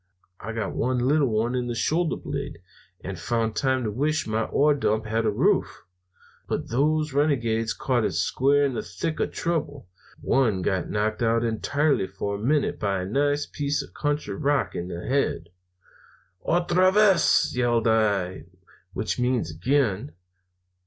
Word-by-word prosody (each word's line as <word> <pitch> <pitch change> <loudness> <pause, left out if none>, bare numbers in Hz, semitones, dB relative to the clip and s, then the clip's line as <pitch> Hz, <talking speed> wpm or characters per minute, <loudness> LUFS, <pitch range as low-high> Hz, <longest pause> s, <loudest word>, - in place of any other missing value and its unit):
I 115 - -6
got 110 -3 -3
one 130 +1 0
little 140 +4 +2
one 110 +2 0
in 125 -1 -1
the 120 - -3
shoulder 160 +8 0
blade, 140 - -5 0.4
and 95 -2 -6
found 115 +2 -1
time 130 -2 +1
to 110 - -2
wish 150 +8 0
my 110 0 -1
ore 150 +1 +3
dump 110 -6 0
had 110 +1 0
a - - +4
roof. 105 - +1 0.6
But - - -3
those 150 +4 +1
renegades 115 -6 +1
caught 125 -3 0
it - - 0
square 140 +2 +2
in 135 - -1
the 120 - -2
thick 95 - -4
of - - -1
trouble. 145 - -3 0.3
One 110 -9 +1
got 95 -2 -1
knocked 110 +1 -1
out 115 0 +2
entirely 140 +2 0
for 100 +1 -4
a 100 - -4
minute, 145 +3 +1
by 100 -2 -1
a - - -4
nice 145 +7 0
piece 145 0 -2
of - - -15
country 145 -8 -2
rock 135 -4 0
in 85 - -4
the 85 -1 -6
head. 125 -11 -1 0.9
"'Otra 175 +2 +3
vez!' 200 -9 +4
yells 120 -2 +1
I, 100 -7 +1 0.5
which 110 - -3
means 125 -9 0
'again.' 100 - 0
120 Hz, 160 wpm, -25 LUFS, 110-145 Hz, 0.9 s, a